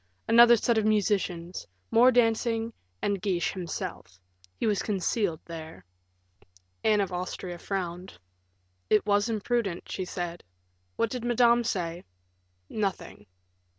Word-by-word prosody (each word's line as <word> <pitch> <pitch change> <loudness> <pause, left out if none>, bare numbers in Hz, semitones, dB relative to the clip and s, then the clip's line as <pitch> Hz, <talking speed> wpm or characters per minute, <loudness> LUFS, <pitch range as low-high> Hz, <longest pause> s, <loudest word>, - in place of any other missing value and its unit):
Another 235 +1 +8
set 230 +1 +2
of 215 - -1
musicians; 195 -5 0 0.2
more 245 +3 +6
dancing, 230 -1 +1 0.3
and 200 -2 0
Guiche 185 -3 0
himself 165 - -6 0.4
he - - -3
was 210 -3 +1
concealed 200 -3 -1
there." 160 - -9 1.0
Anne 215 -2 +4
of 195 -2 -2
Austria 180 0 -5
frowned. 180 - -4 0.7
"It 210 -1 +4
was 205 +2 +2
imprudent," 220 -4 -2
she 185 - -3
said. 175 -1 -5 0.5
"What 230 - 0
did 250 -2 -4
Madame 240 0 +4
say?" 175 -6 -2 0.6
"Nothing." 195 - -4
205 Hz, 120 wpm, -28 LUFS, 175-225 Hz, 1.0 s, Another